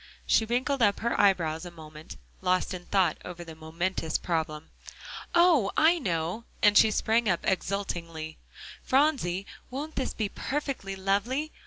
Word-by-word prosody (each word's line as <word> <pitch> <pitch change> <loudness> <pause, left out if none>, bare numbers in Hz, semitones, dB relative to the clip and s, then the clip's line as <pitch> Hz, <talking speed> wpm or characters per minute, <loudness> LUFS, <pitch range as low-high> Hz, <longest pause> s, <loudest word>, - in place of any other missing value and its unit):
She 220 - +3
wrinkled 250 +4 0
up 205 -3 +3
her 235 +1 +1
eyebrows 170 -5 +2
a 175 - -6
moment, 155 -2 -11 0.2
lost 185 +1 +1
in 175 -1 -7
thought 185 -5 +2
over 175 -1 -7
the 165 -1 -10
momentous 160 +1 -2
problem. 160 -2 -3 0.6
"Oh! 340 - +5
I 335 +2 +5
know," 175 - -2 0.2
and 210 0 +6
she 220 - +7
sprang 220 +1 +1
up 175 - +1
exultingly. 170 -5 -3 0.4
"Phronsie, 255 - +1 0.2
won't 290 +5 -6
this 265 - -2
be 215 - -1
perfectly 265 -5 -4
lovely? 205 +11 -1
195 Hz, 145 wpm, -28 LUFS, 170-240 Hz, 0.6 s, she